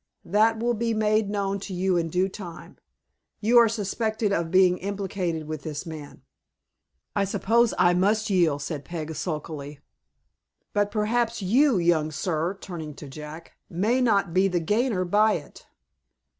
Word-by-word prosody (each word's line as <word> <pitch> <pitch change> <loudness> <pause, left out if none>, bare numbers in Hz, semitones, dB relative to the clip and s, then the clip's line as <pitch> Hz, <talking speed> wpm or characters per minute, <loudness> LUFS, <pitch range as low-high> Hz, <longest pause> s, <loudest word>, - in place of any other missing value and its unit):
"That 220 +4 +3
will 240 +1 +1
be 230 0 -1
made 215 -1 +2
known 200 -1 -1
to 195 -1 -6
you 185 +1 +1
in 170 -1 +1
due 180 +3 +1
time. 185 -3 -10 0.6
You 235 +3 +5
are 230 -1 +5
suspected 220 0 -1
of 165 -3 -1
being 185 0 +4
implicated 190 -5 -3
with 155 -2 -5
this 150 +2 -5
man." 155 -3 -9 0.9
"I 200 - +2
suppose 225 +4 +2
I 175 -1 +4
must 210 +5 +2
yield," 170 -8 +2
said 145 0 -5
Peg, 160 -1 -5
sulkily. 150 -2 -5 0.9
"But 205 0 +1
perhaps 225 +1 0
you, 250 +5 +4
young 170 -3 +2
sir," 165 +3 -2
turning 160 -6 -7
to 145 - -10
Jack, 150 +4 -9 0.2
"may 220 +9 +1
not 200 -7 +2
be 190 +2 +4
the 180 -2 0
gainer 210 +2 0
by 210 +4 +3
it." - - -8
190 Hz, 155 wpm, -25 LUFS, 165-215 Hz, 0.9 s, You